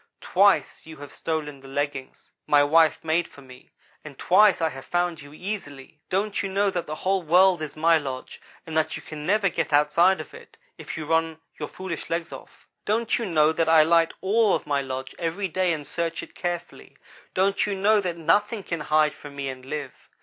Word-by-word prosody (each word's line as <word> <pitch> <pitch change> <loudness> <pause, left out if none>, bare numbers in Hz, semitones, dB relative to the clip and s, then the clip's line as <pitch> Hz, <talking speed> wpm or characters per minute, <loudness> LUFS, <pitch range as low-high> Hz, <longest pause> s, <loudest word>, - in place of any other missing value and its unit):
Twice - - +2
you 160 -1 -10
have 145 0 -10
stolen 150 -3 -4
the 135 - -14
leggings 140 -1 -5 0.2
my 145 -1 +5
wife 160 +1 +4
made 165 +2 +1
for 140 - -16
me, 125 -1 -15 0.3
and 145 -3 -11
twice 195 +2 +4
I 165 -1 +1
have 135 -2 -10
found 175 -2 -1
you 145 0 -13
easily. 150 -6 -7
Don't 200 +2 -1
you 195 - -3
know 200 +1 +1
that 175 -3 -3
the 155 - -4
whole 190 0 +2
world 180 +1 +4
is 155 0 -6
my 165 +1 +4
lodge 130 -3 -7 0.2
and 160 - -7
that 160 -1 +1
you - - -11
can 150 -1 -8
never 205 +1 +3
get 175 - -2
outside 150 +6 +4
of 155 - -9
it, - - -14 0.2
if - - -8
you 155 - -5
run 160 0 0 0.2
your 150 - -3
foolish 185 -4 -6
legs 165 0 -3
off? - - -13 0.2
Don't 225 +3 0
you 230 - -3
know 155 -3 +3
that 160 0 0
I 160 -1 +7
light 165 +1 +3
all 210 +2 +3
of - - -4
my 145 -1 0
lodge 130 0 -6
every 175 +4 -2
day 185 0 0
and 155 -3 -3
search 165 +1 -3
it - - -12
carefully? 175 -1 -6 0.4
Don't 195 +2 +2
you 205 - -2
know 205 +2 +3
that 175 -3 -3
nothing 205 +6 +1
can 170 -3 -4
hide 150 0 +2
from 145 -1 -12
me 140 -1 -4
and 130 -1 -8
live? 140 0 -5
165 Hz, 210 wpm, -25 LUFS, 150-185 Hz, 0.4 s, I